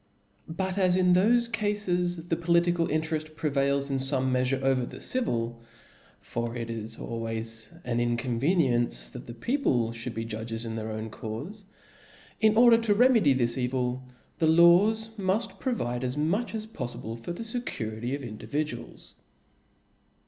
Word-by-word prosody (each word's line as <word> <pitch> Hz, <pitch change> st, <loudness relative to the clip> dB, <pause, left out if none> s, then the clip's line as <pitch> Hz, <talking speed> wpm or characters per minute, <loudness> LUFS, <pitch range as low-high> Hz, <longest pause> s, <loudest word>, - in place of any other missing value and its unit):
But 190 Hz, +3 st, -2 dB
as 185 Hz, -2 st, +4 dB
in 180 Hz, -1 st, +4 dB
thofe 235 Hz, +6 st, +3 dB
cafes 180 Hz, -6 st, -1 dB
the 165 Hz, -, +2 dB
political 170 Hz, 0 st, +2 dB
intereft 155 Hz, 0 st, -2 dB
prevails 140 Hz, -2 st, 0 dB
in 135 Hz, -, +1 dB
fome 130 Hz, -1 st, +1 dB
meafure 130 Hz, +1 st, +1 dB
over 135 Hz, -1 st, +2 dB
the -, -, -7 dB
civil 120 Hz, -, -1 dB, 0.6 s
(for 115 Hz, 0 st, -4 dB
it 115 Hz, -1 st, -4 dB
is 115 Hz, 0 st, -5 dB
always 115 Hz, -1 st, -2 dB
an 120 Hz, -1 st, -1 dB
inconveniency 120 Hz, -, +1 dB
that -, -, -9 dB
the 120 Hz, -, -8 dB
people 125 Hz, -, 0 dB
(hould 115 Hz, +1 st, -5 dB
be 115 Hz, -, -3 dB
judges 115 Hz, +1 st, -5 dB
in 110 Hz, -1 st, -4 dB
their 110 Hz, 0 st, -4 dB
own 110 Hz, 0 st, -5 dB
caufe), 115 Hz, -, -6 dB, 0.8 s
in 220 Hz, -1 st, +4 dB
order 235 Hz, -1 st, +7 dB
to 220 Hz, -3 st, +2 dB
remedy 225 Hz, -, +5 dB
this 120 Hz, -1 st, +1 dB
evil, 125 Hz, 0 st, -1 dB, 0.4 s
the 160 Hz, -, +3 dB
laws 185 Hz, +7 st, +5 dB
muft 195 Hz, +4 st, -1 dB
provide 125 Hz, -, -2 dB
as 130 Hz, +2 st, -2 dB
much 195 Hz, +11 st, 0 dB
as 215 Hz, -1 st, -4 dB
poflible 120 Hz, -, -6 dB
for 115 Hz, +8 st, -7 dB
thG 225 Hz, +6 st, -4 dB
fecurity 115 Hz, -, -4 dB
of 140 Hz, -, -7 dB
individuals. 125 Hz, +7 st, -5 dB
140 Hz, 150 wpm, -28 LUFS, 115-185 Hz, 0.8 s, order